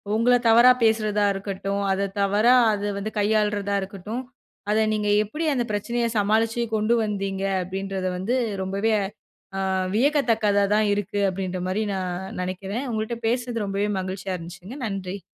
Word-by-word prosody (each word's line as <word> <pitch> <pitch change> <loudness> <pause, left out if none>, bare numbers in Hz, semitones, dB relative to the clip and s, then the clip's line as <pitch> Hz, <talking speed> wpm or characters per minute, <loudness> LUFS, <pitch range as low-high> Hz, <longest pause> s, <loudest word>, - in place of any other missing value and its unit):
உங்கள 245 +3 +4
தவறா 235 +3 +8
பேசுறதா 215 -2 +2
இருக்கட்டும். 195 0 -3
அத 195 +1 0
தவறா, 210 +5 +4 0.2
அது 205 0 -3
வந்து 215 +2 -4
கையாள்றதா 210 -1 +1
இருக்கட்டும். 200 +5 -5 0.5
அத 215 - +3
நீங்க, 210 -1 0
எப்படி 305 +10 -4
அந்த 245 - +1
பிரச்சனைய 235 +3 -1
சமாளிச்சு 225 +3 +2
கொண்டு 215 +2 +2
வந்தீங்க? 195 -2 -2 0.2
அப்படின்றத 190 0 -3
வந்து 210 +8 -1 0.3
ரொம்பவே 200 +4 0 0.7
அ - - 0 0.3
வியக்கத்தக்கதாதா 220 -7 +2
இருக்கு. 205 0 -2
அப்படின்ற 185 -1 -3
மாரி 210 +4 0
நான் 185 0 -4
நெனக்கிறேன். 190 +7 -4
உங்கள்ட்ட 220 +2 -2
பேசினது, 240 -2 -1
ரொம்பவே 200 +1 -1
மகிழ்ச்சியா 185 0 -4
இருந்துச்சுங்க. 180 +8 -9
நன்றி! 195 -1 -4
205 Hz, 135 wpm, -24 LUFS, 195-225 Hz, 0.7 s, தவறா